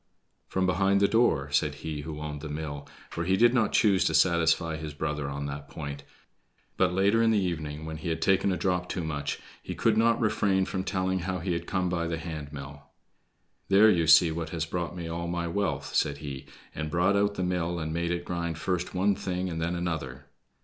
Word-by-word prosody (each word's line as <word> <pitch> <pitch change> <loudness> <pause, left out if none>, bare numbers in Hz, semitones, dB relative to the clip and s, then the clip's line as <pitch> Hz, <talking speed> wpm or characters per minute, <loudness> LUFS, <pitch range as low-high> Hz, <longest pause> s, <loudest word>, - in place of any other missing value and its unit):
"From 95 0 0
behind 95 +2 +3
the 100 - +4
door," 85 - +2
said 70 0 +1
he 75 -2 -3
who 75 0 -6
owned 75 -1 -5
the 75 - -6
mill, 75 -1 -5 0.2
for 85 - -3
he 95 +2 +2
did 120 +2 +5
not 115 -4 +2
choose 100 -4 +4
to - - +1
satisfy 85 -2 +3
his 75 -1 -6
brother 75 -2 -2
on 70 0 -4
that 70 0 -6
point; 70 -1 -6 0.7
but - - +2
later 100 +5 +3
in 115 - +4
the 110 - +3
evening, 80 -5 -2
when 80 0 -5
he 80 +2 -4
had 80 0 -1
taken 95 +3 +3
a 90 - 0
drop 90 -2 -1
too 90 - -2
much, 75 -2 -3 0.2
he - - -6
could 110 -1 +2
not 115 +1 +3
refrain 100 -4 +2
from 95 0 -3
telling 95 -1 -1
how 90 +1 -2
he 90 +1 -2
had 85 - -4
come 95 -2 0
by 85 -1 -1
the 80 0 -2
hand 80 -3 -6
mill. 70 0 -8 0.9
"There 105 +3 +7
you 85 -4 +2
see 80 +1 +7
what 80 0 -4
has 80 -1 -2
brought 85 +1 -3
me 85 -2 -5
all 85 +1 -3
my 85 0 -2
wealth!" 100 +3 -2
said 70 -1 +1
he, 70 -2 -7 0.3
and 75 0 -4
brought 90 +4 +2
out 100 0 +2
the 95 - -2
mill 90 -1 -1
and 80 -1 -3
made 85 +1 -1
it 85 0 -2
grind 85 -2 -3
first 90 +2 -2
one 100 +2 +3
thing 90 -1 -3
and 80 0 -3
then 85 +2 -1
another. 80 -6 -4
85 Hz, 220 wpm, -28 LUFS, 75-95 Hz, 0.9 s, There